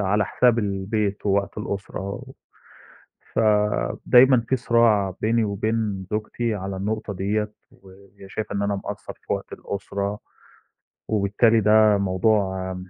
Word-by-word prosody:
على 105 +1 +2
حساب 120 +3 +2
البيت 100 0 -2
ووقت 100 +1 0
الأسرة. 100 +2 -5 1.1
فدايمًا 105 - +4
في 130 - +2
صراع 115 -6 +2
بيني 115 +1 +2
وبين 105 -1 -2
زوجتي 110 +2 -2
على 95 -1 -5
النقطة 105 +2 -3
ديّة، 105 +3 -1 0.2
وهي 95 +1 -17
شايفة 105 +1 -5
إن 100 - -1
أنا 100 0 0
مقصّر - - -6
في - - -6
وقت - - -4
الأسرة، 100 +1 -4 0.9
وبالتالي 110 +2 +3
ده 105 0 +5
موضوع، 95 -1 0
105 Hz, 115 wpm, -23 LUFS, 100-110 Hz, 1.1 s, ده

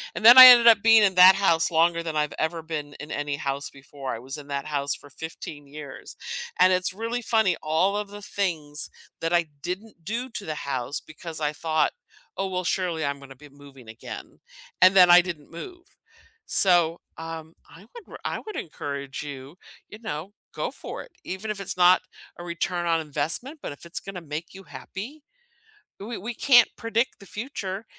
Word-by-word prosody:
And - - -4
then 240 +3 +10
I 255 - +14
ended 240 -2 +9
up 225 -3 +7
being 225 -1 +7
in 195 -2 +3
that 185 +1 +9
house 185 -4 +2
longer 170 +1 +3
than 160 -2 -4
I've 150 -1 0
ever 160 +1 -1
been 150 -3 -5
in 150 +1 -9
any 145 -1 -2
house 140 0 -3
before. 135 -1 -8
I 115 - -8
was 135 +4 -7
in 145 -1 -11
that 140 -1 -4
house 145 -2 -1
for 145 - -15
15 145 -1 -9
years. 145 -2 -10 0.4
And 185 0 +6
it's 185 0 +1
really 230 +4 -3
funny, 220 -6 +2
all 165 +6 +1
of 210 -1 -4
the 205 0 -10
things 160 -8 -3 0.3
that 165 +1 -1
I 170 -1 +3 0.2
didn't 180 +1 -7
do 235 +8 -4
to 210 -4 -7
the 155 - -4
house 140 0 -3
because 160 +1 -9
I 150 0 0
thought, 155 0 0 0.5
"Oh, 195 - -1
well 185 0 -2
surely 175 -4 -1
I'm 140 0 -3
gonna 135 -1 -13
be 150 +2 -16
moving 140 -4 -16
again," 115 +1 -10 0.4
and 185 +1 +7
then 180 -2 +8
I 175 0 +9
didn't 170 -5 -8
move. 355 - -10 0.6
So, 175 -3 +3 0.2
um, 165 0 -8
I 165 - -15
would 475 - -11
r - - -9
I - - -2
would 430 - -7
encourage 140 -3 -6
you, 140 +3 -9 0.3
you 215 - -11
know, 200 -3 -6 0.2
go - - -3
for - - -8
it. - - -18
Even 190 +4 -6
if 205 - -6
it's 195 - -4
not 180 +1 +6 0.4
a 175 - -8
return 175 +1 -3
on 165 -1 +2
investment, 160 - -4
but - - -4
if 145 - -11
it's 170 - -6
gonna 195 -2 -7
make 155 +2 -7
you 195 0 -11
happy. 255 +12 -9 0.8
We 220 +3 -6
we 230 +6 -5
can't 245 -3 +5
predict 230 +2 -1
the 200 - -13
future, 210 -3 -6
170 Hz, 195 wpm, -25 LUFS, 150-200 Hz, 0.8 s, I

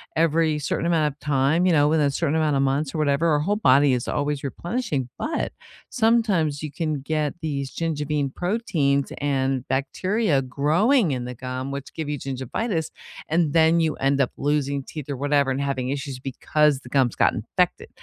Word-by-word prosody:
every 160 -1 +2
certain 150 +3 -2
amount 160 -3 +2
of 145 - -36
time, 145 +4 +2
you 180 - +4
know, 145 -1 +4
within 155 -2 +3
a 140 - +1
certain 155 +1 0
amount 155 -2 +2
of 135 - +2
months 135 +1 0
or - - -1
whatever. 145 +2 +2
Our 150 -2 +3
whole 200 +7 0
body 140 -6 +5
is 125 - -2
always 145 -1 -1
replenishing, 145 - -3
but 315 - -2 0.4
sometimes 210 - +1
you 150 - -4
can 155 -4 -2
get 150 0 -1
these 140 -4 -3
gingivin 150 -4 -1
proteins 165 - 0
and 135 -2 -1
bacteria 165 - 0
growing 160 - +2
in 125 -2 -3
the 125 0 -6
gum, 130 +2 -5
which 140 -1 -6
give 160 -2 -4
you 145 -1 -2
gingivitis, 145 - -3 0.4
and 160 -2 +1
then 165 +1 +4
you 160 -1 0
end 140 0 +1
up 130 - +1
losing 140 -1 0
teeth 150 0 -8
or 140 - -3
whatever 140 -1 +1
and 135 - -1
having 135 -2 -2
issues 135 -1 -4
because 140 +2 +1
the - - -12
gums 130 -4 +2
got - - +3
infected, - - -1
145 Hz, 185 wpm, -24 LUFS, 135-160 Hz, 0.4 s, body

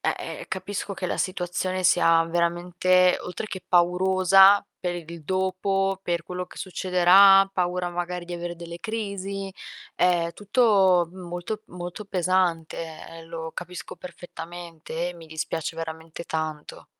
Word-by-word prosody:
eh-eh, - - -3
capisco 200 0 -4
che 185 - -4
la - - -3
situazione 185 0 -2
sia 165 -2 +5
veramente, 175 +2 +2
oltre 180 +4 -6
che 190 -3 -7
paurosa 190 +3 +5 0.2
per 180 -1 -2
il 170 -1 -9
dopo, 190 +1 0
per 170 -2 -1
quello 180 0 -5
che - - -16
succederà, 190 +1 +5
paura 180 -1 -1
magari 175 0 -4
di 175 - -8
avere 175 0 -5
delle 170 0 -9
crisi. 200 -3 -4 0.4
Ehm, 175 -2 +2
tutto 200 -5 +3
molto, 180 +4 -6
molto 180 +3 -7
pesante, 180 -3 0
ehm, 165 0 -9
lo 165 -1 -6
capisco 180 +1 -7
perfettamente, 170 -1 -7
e - - -11
mi 165 -2 -12
dispiace 160 +1 -4
veramente 160 +1 -7
tanto. 155 -2 -5
180 Hz, 130 wpm, -25 LUFS, 170-190 Hz, 0.4 s, sia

